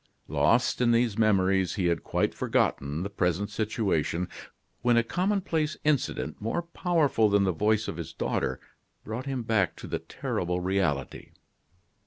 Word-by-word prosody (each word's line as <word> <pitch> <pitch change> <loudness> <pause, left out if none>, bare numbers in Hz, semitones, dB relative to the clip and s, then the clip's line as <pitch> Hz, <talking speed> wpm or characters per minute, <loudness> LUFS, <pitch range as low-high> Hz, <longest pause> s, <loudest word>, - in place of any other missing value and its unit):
Lost 120 +2 +2
in 120 - +4
these 115 -3 +2
memories, 95 -4 +2
he 95 -4 -1
had 85 -1 +1
quite - - 0
forgotten 70 +5 0
the 100 - -3
present 100 +2 0
situation, 100 -6 -1 0.5
when 120 0 +3
a 115 - +4
commonplace 175 - 0
incident, 150 -3 0
more 115 +11 -1
powerful 165 - +2
than 100 0 +3
the 95 - +2
voice 105 +5 +1
of - - -4
his 85 -3 -6
daughter, - - -2 0.4
brought 120 +5 -5
him 130 -3 -2
back 110 -6 +1
to - - -10
the - - -3
terrible 90 0 -3
reality. 90 -7 -1
105 Hz, 150 wpm, -28 LUFS, 90-125 Hz, 0.5 s, in